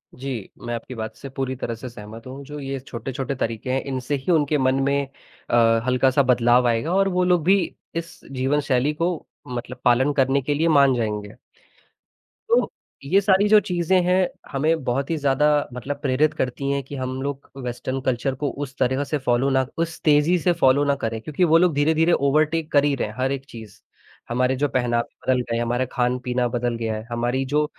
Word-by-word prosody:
जी, 125 -5 -5
मैं 120 0 -4
आपकी 120 +2 -7
बात 110 -1 -5
से 135 - -9
पूरी 130 0 -3
तरह 115 -2 -4
से 125 +3 -8
सहमत 110 +1 -11
हूँ, 135 +2 -8
जो 150 +1 -8
ये 135 -1 -4
छोटे-छोटे 130 +1 -5
तरीके 115 0 -3
हैं 135 - +1
इनसे 130 +1 -2
ही 140 +6 -2
उनके 150 -2 +2
मन 130 -1 +2
में 140 0 +1 0.4
अ, 115 -1 +4
हल्का-सा 130 +2 +3
बदलाव 125 0 +4
आएगा 120 +9 0
और 195 0 +3
वो 180 0 +1
लोग 180 -3 +2
भी 190 +5 +5 0.4
इस 165 0 -5
जीवन 135 +2 0
शैली 130 +3 +2
को 165 +1 -2 0.2
मतलब 125 0 -6
पालन 130 +4 +4
करने 135 0 +2
के 145 +3 -1
लिए 160 +3 +1
मान 140 -4 +5
जाएँगे। 105 -2 -3 1.2
तो, 475 - +3 0.3
ये 170 +8 +3
सारी 195 +1 +3
जो 215 -1 +8
चीज़ें 180 0 +1
हैं, 180 0 +3 0.2
हमें 155 +2 +1
बहुत 135 +4 -1
ही 165 - 0
ज़्यादा 145 0 +2 0.3
मतलब 135 +3 -4
प्रेरित 145 +3 +2
करती 130 +2 -2
हैं 140 - 0
कि 140 +2 -9
हम 130 0 -4
लोग 140 0 -5
वेस्टर्न 125 +2 -3
कल्चर 130 +1 -1
को 145 - +1 0.2
उस 135 0 -15
तरीका 130 +2 +1
से 150 +1 -2
फॉलो 125 +3 +2
ना 130 -1 +2
उस 165 0 -2
तेज़ी 150 +4 +4
से 175 +2 +2
फॉलो 135 +2 +5
ना 140 -1 +2
करें, 115 0 -2
क्योंकि 155 +6 -1
वो 165 -1 +5
लोग 175 -2 +3
धीरे-धीरे 160 +3 +3
ओवरटेक 155 +3 +1
कर 145 -1 +4
ही 145 - +2
रहे - - -2
हैं 105 - -10
हर 130 +1 0
एक 135 -1 -4
चीज़। 110 -3 -11 0.5
हमारे 125 +2 +1
जो 145 +3 +1
पहनावा 120 -2 +1 0.2
बदल 130 -1 +3
गए 120 -1 -3
हैं, 120 - 0
हमारा 120 +2 0
खान-पीना 125 0 0
बदल 120 0 -1
गया 115 -1 -2
है, 110 - -6
हमारी 120 +3 -1
जो 150 0 +3
135 Hz, 205 wpm, -23 LUFS, 125-150 Hz, 1.2 s, जो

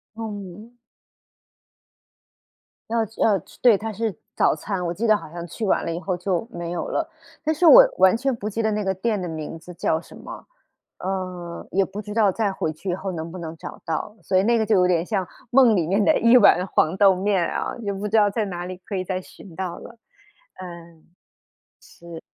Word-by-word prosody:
嗯。 210 -1 -7 2.2
要 230 0 +1
吃 220 - -11
要 205 -3 +4
吃 - - -19
对， 235 -5 +6
它 220 +2 -5
是 220 -2 -2 0.2
早 - - +3
餐， 180 +3 -4
我 170 - -1
记 215 +6 -3
得 215 - +6
好 205 - -6
像 170 +1 -7
去 220 - -7
晚 195 - +1
了 165 - -2
以 170 - -4
后 180 +1 -2
就 180 +3 -2
没 170 -1 -5
有 175 - -3
了。 325 - -1 0.4
但 315 +1 +1
是 320 +3 +1
我 - - +10
完 190 +3 +5
全 265 +1 0
不 210 -2 -5
记 220 +2 -2
得 220 -1 +1
那 210 0 -1
个 190 -1 0
店 210 +3 -1
的 180 - -3
名 160 0 -6
字 180 +2 -11
叫 160 -1 0
什 - - -14
么， - - -10 0.5
呃， 185 -2 -5
也 195 0 +2
不 200 +2 -7
知 210 0 -8
道 215 -4 +4
再 210 +1 0
回 160 -4 -3
去 170 +5 -7
以 175 - 0
后 190 +1 -5
能 165 -1 -6
不 185 - -8
能 165 -2 -6
找 - - -9
到。 165 +6 -3
所 190 - +1
以 190 - +4
那 235 +3 +3
个 220 - +1
就 215 - +3
有 180 -1 +4
点 175 -2 +1
像 190 -3 -2 0.2
梦 245 -4 +6
里 175 -4 +1
面 200 +4 +2
的 - - +4
1 230 +2 +5
碗 180 -6 +5
黄 175 -1 +1
豆 195 -2 +6
面 190 -1 +1
啊， - - -3
也 200 -2 -2
不 200 +2 -4
知 220 +2 +2
道 205 -1 +5
在 215 +1 -1
哪 175 -3 -5
里 185 0 -6
可 190 +3 -7
以 185 - -1
再 185 0 -3
寻 180 -1 -14
到 185 -1 -4
了， 235 - -12 0.6
嗯。 170 -3 -11 0.8
是。 170 - -12
190 Hz, 235 characters per minute, -23 LUFS, 175-215 Hz, 2.2 s, 我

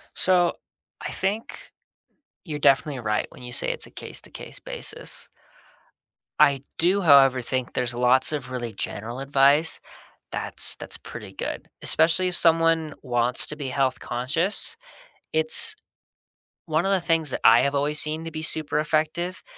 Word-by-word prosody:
So 180 -2 +2 0.5
I - - -5
think 200 +4 -4 0.7
you're 155 -5 -5
definitely 140 -1 +2
right 105 -2 -1
when - - -14
you 125 0 -7
say - - +1
it's - - -2
a - - -15
case-to-case - - -8
basis. - - -4 1.1
I 140 -1 +5 0.2
do, 185 +4 +3
however, 135 -5 +6
think 130 +1 -3
there's 125 -1 -2
lots 125 +4 +4
of 135 -4 -4
really 120 -3 -4
general 115 +5 -5
advice 140 +3 +3 0.5
that's - - -1
that's - - -5
pretty - - -10
good, - - -5
especially 165 +3 +2
if 180 - 0
someone 165 -2 +3
wants 125 -1 0
to 150 - -5
be 145 -3 -5
health-conscious. 135 - -1 0.6
It's 475 0 +3 0.9
One 160 +1 +1
of 195 - +2
the 195 - +3
things 165 -3 0
that - - -3
I 115 +1 +8
have 140 0 0
always 145 +2 0
seen 155 +1 -2
to 165 - -5
be 155 0 -6
super 155 -1 0
effective 160 +4 -1
150 Hz, 145 wpm, -24 LUFS, 130-165 Hz, 1.1 s, I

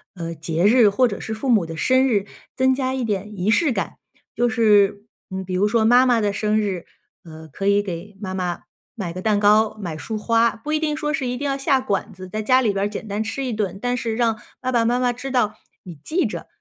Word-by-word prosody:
呃， 165 -2 -5
节 165 +3 -1
日 225 0 +6
或 245 +5 +3
者 200 - -5
是 220 - -5
父 255 +4 -4
母 215 -7 +4
的 165 0 -7
生 260 +9 +3
日， 205 -5 +1 0.3
增 260 0 +3
加 260 -1 -1
一 260 - -2
点 210 -1 -3
仪 190 +4 0
式 295 +4 +3
感。 - - -3 0.4
就 240 0 +2
是 210 -3 +3 0.2
嗯， 190 0 -5
比 185 - -5
如 195 +3 +2
说 220 0 +2
妈 245 +3 +6
妈 240 -2 +3
的 205 -2 0
生 215 +1 +1
日， 190 -5 -2 0.4
呃， 160 -1 -11
可 195 +8 -3
以 200 0 +3
给 190 +2 -7
妈 190 -2 -5
妈 180 -2 -3 0.3
买 185 -6 -4
个 185 - -6
蛋 210 -1 +2
糕， 210 +1 +4
买 170 -6 -5
束 220 +5 -5
花。 230 +1 +2
不 295 +7 -5
一 310 - +2
定 305 -1 -1
说 300 -1 -2
是 285 -5 -1
一 245 0 -2
定 285 +1 -3
要 275 - 0
下 270 -1 +2
馆 205 -4 -2
子， 185 0 -10
在 215 +4 -4
家 255 +4 +4
里 220 -6 +1
边 195 +1 0
儿 - - +1
简 210 +1 -7
单 205 +2 -2
吃 270 +5 -4
一 245 - -2
顿， 200 -4 -2
但 245 0 0
是 235 -3 -2
让 225 -2 +1 0.2
爸 255 -1 -2
爸 235 -2 +2
妈 245 +2 +2
妈 245 -1 +1
知 270 +3 -7
道 245 -5 +1 0.3
你 180 -3 -9
记 355 +3 0
着， - - -5
215 Hz, 270 characters per minute, -22 LUFS, 195-250 Hz, 0.4 s, 日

